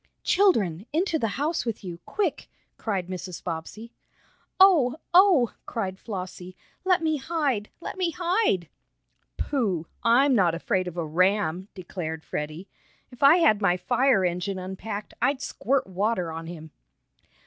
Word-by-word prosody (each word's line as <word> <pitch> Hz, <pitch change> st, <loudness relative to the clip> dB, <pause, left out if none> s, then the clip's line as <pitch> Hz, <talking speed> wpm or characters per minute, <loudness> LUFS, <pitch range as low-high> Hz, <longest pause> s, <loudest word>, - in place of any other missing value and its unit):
"Children! 210 Hz, -, +2 dB
Into 325 Hz, +1 st, +1 dB
the 225 Hz, -, 0 dB
house 310 Hz, +4 st, 0 dB
with 230 Hz, -3 st, -4 dB
you 175 Hz, -2 st, -7 dB
quick!" 395 Hz, -7 st, -2 dB, 0.3 s
cried 195 Hz, -5 st, -2 dB
Mrs. 185 Hz, -1 st, -6 dB
Bobbsey. 190 Hz, +7 st, -6 dB, 0.7 s
"Oh! 330 Hz, -10 st, +6 dB, 0.2 s
Oh!" 355 Hz, -, +6 dB
cried 190 Hz, -4 st, -3 dB
Flossie. 185 Hz, -3 st, -7 dB, 0.3 s
"Let 365 Hz, -2 st, +2 dB
me 315 Hz, -1 st, +1 dB
hide! 275 Hz, -8 st, -1 dB
Let 360 Hz, -, -7 dB
me 360 Hz, -2 st, +2 dB
hide!" 350 Hz, -, +1 dB, 0.7 s
"Pooh! 200 Hz, -, -1 dB, 0.2 s
I'm 260 Hz, +4 st, +4 dB
not 180 Hz, -8 st, +3 dB
afraid 185 Hz, +2 st, -1 dB
of 180 Hz, 0 st, -7 dB
a 170 Hz, -, -1 dB
ram!" 185 Hz, +2 st, +1 dB
declared 165 Hz, -4 st, -6 dB
Freddie. 155 Hz, +5 st, -5 dB, 0.4 s
"If 245 Hz, -, -15 dB
I 280 Hz, +3 st, +8 dB
had 215 Hz, -, +4 dB
my 180 Hz, -3 st, +3 dB
fire 245 Hz, +1 st, +2 dB
engine 180 Hz, +2 st, -2 dB
unpacked, 190 Hz, +3 st, -6 dB
I'd 275 Hz, -1 st, +2 dB
squirt 275 Hz, -1 st, -1 dB
water 190 Hz, -2 st, -1 dB
on 165 Hz, 0 st, -6 dB
him!" 160 Hz, -2 st, -9 dB
205 Hz, 140 wpm, -26 LUFS, 180-280 Hz, 0.7 s, I